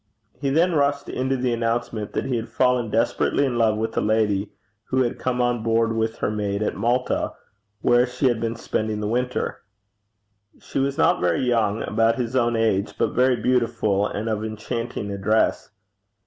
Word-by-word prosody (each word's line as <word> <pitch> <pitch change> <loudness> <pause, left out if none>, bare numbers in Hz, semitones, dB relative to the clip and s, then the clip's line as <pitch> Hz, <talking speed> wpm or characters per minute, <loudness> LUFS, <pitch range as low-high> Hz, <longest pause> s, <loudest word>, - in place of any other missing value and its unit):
He 140 0 -1
then 170 +5 +3
rushed 140 -1 +1
into 130 +1 -1
the 125 -1 0
announcement 115 -2 -2
that - - -1
he 130 - -1
had 115 0 -3
fallen 125 -3 +1
desperately 115 +5 +1
in 120 -3 -1
love 110 -2 +3
with 110 +1 -2
a - - +1
lady 105 -2 +1 0.3
who 130 0 +1
had 120 - -3
come 125 -1 -1
on 120 -1 +1
board 115 0 +1
with 110 0 -1
her - - -1
maid 105 -1 -2
at - - -1
Malta, 120 +5 0 0.5
where 120 +1 +4
she 125 +2 -3
had 120 -3 0
been 115 0 -1
spending 110 -2 -2
the 105 - -2
winter. 125 +3 -2 1.0
She - - -4
was 140 +1 0
not - - +3
very 90 +5 +1
young, 115 -4 +1
about 115 0 +2
his 125 -1 -3
own 120 -2 +2
age, 110 -3 0
but - - 0
very 125 +1 +3
beautiful, 115 -4 +1
and 105 +2 -4
of 110 -1 -1
enchanting 110 0 -4
address. 100 +3 +1
115 Hz, 180 wpm, -23 LUFS, 110-125 Hz, 1.0 s, where